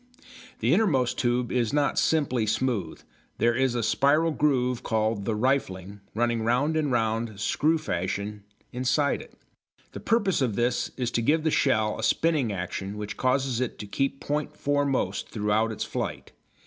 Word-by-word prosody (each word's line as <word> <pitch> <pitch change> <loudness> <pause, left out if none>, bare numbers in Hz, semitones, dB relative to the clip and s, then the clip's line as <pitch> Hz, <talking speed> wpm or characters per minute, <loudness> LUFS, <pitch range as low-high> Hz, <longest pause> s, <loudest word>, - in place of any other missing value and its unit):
The 120 +6 +3
innermost 160 - +2
tube 120 -1 0
is 120 -2 0
not 145 -1 +2
simply 130 -8 +1
smooth. 110 -6 -1 0.4
There 120 +1 +3
is 130 0 +1
a 120 - 0
spiral 150 +8 +3
groove, 125 -5 +1
called 110 -2 -1
the 110 - 0
"rifling," 105 -6 -1 0.2
running 120 0 +1
round 125 +8 +1
and 150 -3 0
round, 115 -2 -1
screw 155 +9 +2
fashion, 100 - -3 0.3
inside 130 +4 +1
it. - - -15 0.5
The - - -7
purpose 205 -8 +1
of 120 -6 0
this 120 +2 0
is 125 -2 -1
to 115 - 0
give 155 +7 +2
the 160 - +1
shell 110 -8 +1
a - - -4
spinning 150 -4 +2
action 95 +2 -4
which 105 -1 -5
causes 130 -1 0
it 130 - -2
to - - -7
keep 135 +6 -1
point 150 0 -3
foremost 140 -8 0
throughout 110 +1 0
its 110 - -3
flight. - - -4
120 Hz, 160 wpm, -26 LUFS, 110-140 Hz, 0.5 s, The